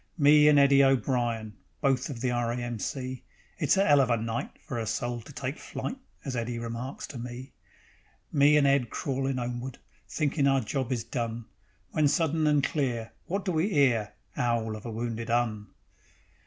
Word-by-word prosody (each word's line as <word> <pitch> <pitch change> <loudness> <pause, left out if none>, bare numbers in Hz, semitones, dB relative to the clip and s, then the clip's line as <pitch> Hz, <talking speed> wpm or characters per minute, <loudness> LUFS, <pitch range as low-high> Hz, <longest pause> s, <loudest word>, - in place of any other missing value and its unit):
Me 150 0 +6
and 150 -1 +6
Eddie 140 0 +6
O'Brian, 120 -5 +1 0.3
Both 135 -2 +1
of 125 -5 -6
the 125 -1 +1
R. 120 -1 0
A. 120 - -2
M. 120 -2 -4
C. 130 0 -4 0.4
"It's - - +3
a 195 - +3
'ell 145 -1 +6
of 130 - +1
a 120 - +3
night 115 +1 -3 0.2
For 120 - -4
a 110 - -3
soul 120 +2 -2
to 120 - -13
take 135 0 -4
flight," - - -5 0.3
As 135 -2 -3
Eddie 120 0 -2
remarks 115 +3 -5
to 125 - -8
me. 125 +2 -7 0.8
Me 145 0 +5
and 145 - +4
Ed 140 -4 +3
crawlin' 135 -1 -2
'omeward, 120 +1 -4 0.3
Thinkin' 145 -2 +1
our 135 -1 +3
job 130 +3 -3
is 120 -3 -1
done, 115 -1 -4 0.5
When 155 -2 +3
sudden 160 +1 +1
and 145 -2 +3
clear, 125 -6 -1 0.2
Wot 195 +3 -2
do 185 - 0
we 170 +5 +1
'ear: 115 -8 +3 0.2
'Owl 115 -2 0
of 110 +2 -8
a - - -4
wounded 115 0 -4
'Un. 115 -3 0
125 Hz, 185 wpm, -28 LUFS, 115-140 Hz, 0.8 s, Me